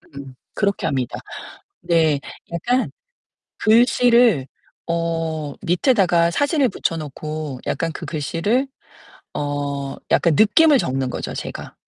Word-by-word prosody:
음 135 -2 -9 0.2
그렇게 200 -1 0
합니다. 130 -5 -2 0.6
네. 160 -4 +2 0.3
약간 245 +10 0 0.7
글씨를 235 - +4 0.4
어 165 -3 -2
밑에다가 175 -3 +3
사진을 285 - +2
붙여 170 -5 -2
놓고 150 -2 -6
약간 165 +3 -1
그 - - -7
글씨를 175 - -1 0.7
어 145 -1 -3
약간 170 -3 +3
느낌을 280 +7 +5
적는 130 - -1
거죠, - - -5
제가. - - -7
165 Hz, 215 characters per minute, -21 LUFS, 145-220 Hz, 0.7 s, 느낌을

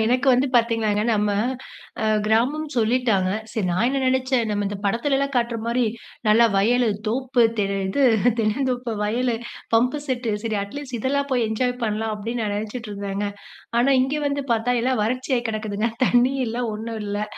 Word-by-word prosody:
எனக்கு 250 +4 +1
வந்து 255 +3 +3
பாத்தீங்கன்னாங்க, 225 -3 +2
நம்ம 210 0 +1 0.7
அ - - 0 0.2
கிராமம் 250 +8 +1
சொல்லிட்டாங்க. 225 -5 +2 0.2
சரி 215 -5 -1
நான் 185 +7 +1
என்ன 275 +1 0
நெனச்சேன், 260 -1 +1
நம்ம 205 -1 -1
இந்த 205 +1 -3
படத்துலலாம் 275 +6 0
காட்றமாரி 235 0 0 0.4
நல்லா 230 +2 +6
வயலு, 240 +4 +3 0.2
தோப்பு, 250 +2 +1 0.2
தெ 205 - +3 0.2
இது 275 +9 0 0.4
தென்னந்தோப்பு 245 +2 0
வயல், 240 +4 0 0.4
பம்பு 250 +6 +3
செட்டு, 250 -3 -1
சரி 220 -2 -1
அட்லீஸ்ட் 255 +4 -6
இதெல்லாம் 280 +4 0
போய் 245 -2 +2
என்ஜாய் 245 +3 0
பண்ணலாம் 220 0 -1
அப்பிடீன்னு 230 +3 -4
நான் 205 -1 -1
நெனச்சிட்டு 220 +2 -5
இருந்தேங்க. 200 0 -3 0.5
ஆனா, 245 +3 +3
இங்க 270 +3 0
வந்து 280 0 -2
பாத்தா, 230 +2 +1
எல்லாம் 255 -2 +1
வறட்சியா 255 +3 0
கெடக்குதுங்க. 215 0 -2 0.2
தண்ணி 245 +2 +3
இல்ல, 230 +1 -4 0.2
ஒண்ணும் 225 +1 -5
இல்லை 205 +1 -2
235 Hz, 155 wpm, -23 LUFS, 215-255 Hz, 0.7 s, நல்லா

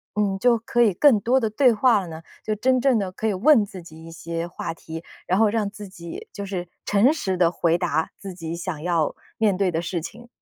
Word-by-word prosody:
嗯， 200 -2 0
就 240 +2 +4
可 230 +2 0
以 220 -5 +4
更 265 -1 +5
多 255 +5 +3
地 225 - 0
对 250 +3 +4
话 230 0 +4
了 185 - -8
呢？ 160 0 -9 0.2
就 215 - -1
真 255 +4 +2
正 265 -2 +3
的 190 -2 -3
可 220 +4 -3
以 215 - +1
问 240 +4 +5
自 195 -3 -10
己 160 -1 -13
一 165 - -10
些 165 +1 -5
话 170 -1 -5
题， 165 0 -9 0.2
然 185 - +2
后 220 -1 +5
让 210 -1 -1
自 205 0 -10
己 170 -3 -9
就 200 - -6
是 190 -3 -4 0.2
诚 210 +8 +4
实 190 - -2
地 170 -2 +3
回 170 -1 +1
答 160 -3 -1
自 195 -2 -8
己 165 -2 -6
想 170 -3 -5
要 165 -3 0 0.2
面 210 -3 +2
对 195 -1 +2
的 165 - -1
事 170 0 -3
情？ 235 +8 -10
195 Hz, 260 characters per minute, -23 LUFS, 170-225 Hz, 0.2 s, 更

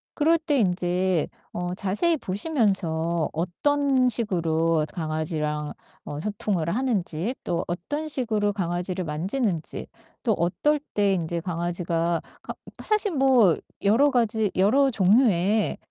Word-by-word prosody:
그럴 320 +2 +3
때 300 -3 +1
인제 180 -3 +1 0.3
어 175 0 -3
자세히 205 - +1
보시면서 185 - 0
어떤 260 - +1
식으로 165 -8 +1
강아지랑 155 -2 -3 0.3
어 145 - -6
소통을 200 -3 -2
하는지 210 -3 -1
또 170 0 -2
어떤 290 - -4
식으로 220 -8 0
강아지를 180 -1 -3
만지는지 175 - -2 0.3
또 230 - +1
어떨 295 - +1
때 205 -1 +2
인제 170 -2 -2
강아지가 170 -1 -1 0.2
가 - - -6 0.3
사실 425 -1 +2
뭐 260 - +4 0.3
여러 235 +9 +4
가지 220 -4 +1
여러 265 +9 +3
종류의 210 -1 +3
190 Hz, 250 characters per minute, -25 LUFS, 170-245 Hz, 0.3 s, 뭐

